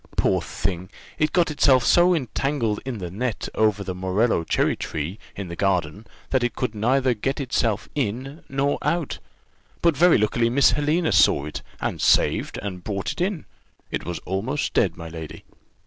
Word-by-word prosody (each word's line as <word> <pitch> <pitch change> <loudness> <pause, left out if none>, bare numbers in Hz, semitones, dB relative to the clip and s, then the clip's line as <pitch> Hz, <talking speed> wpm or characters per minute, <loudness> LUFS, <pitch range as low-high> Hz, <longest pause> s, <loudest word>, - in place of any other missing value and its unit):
Poor - - +2
thing! 90 -1 -4 0.3
it 155 0 +2
got 175 -3 +2
itself 130 -4 +4
so 175 +1 +5
entangled 130 -5 -1
in 130 -3 -4
the 90 -4 -6
net 115 +4 -3
over 105 -2 +2
the 95 -1 -4
morello 95 +2 +1
cherry - - +1
tree, 80 +7 -4 0.2
in 100 -2 -5
the 85 - -6
garden, 95 +1 -1 0.2
that 130 -2 +2
it 120 -2 -1
could 110 - -2
neither 125 +4 +2
get 135 +6 -2
itself 115 -5 0
in 135 +4 -3
nor 140 +1 0
out; 170 -4 -1 0.6
but 170 -3 +4
very 175 +5 +5
luckily 115 +2 +1
Miss 135 +3 +5
Helena 155 +3 +1
saw 70 - +4
it, 75 - -6 0.2
and - - -3
saved, - - +2
and 90 -3 -5
brought 100 -2 -3
it - - -6
in: 185 -3 -1 0.5
it - - -2
was 85 -1 -4
almost 115 +10 -2
dead, - - +2
my 85 -1 -7
lady." 80 -1 -8
115 Hz, 175 wpm, -24 LUFS, 95-140 Hz, 0.6 s, so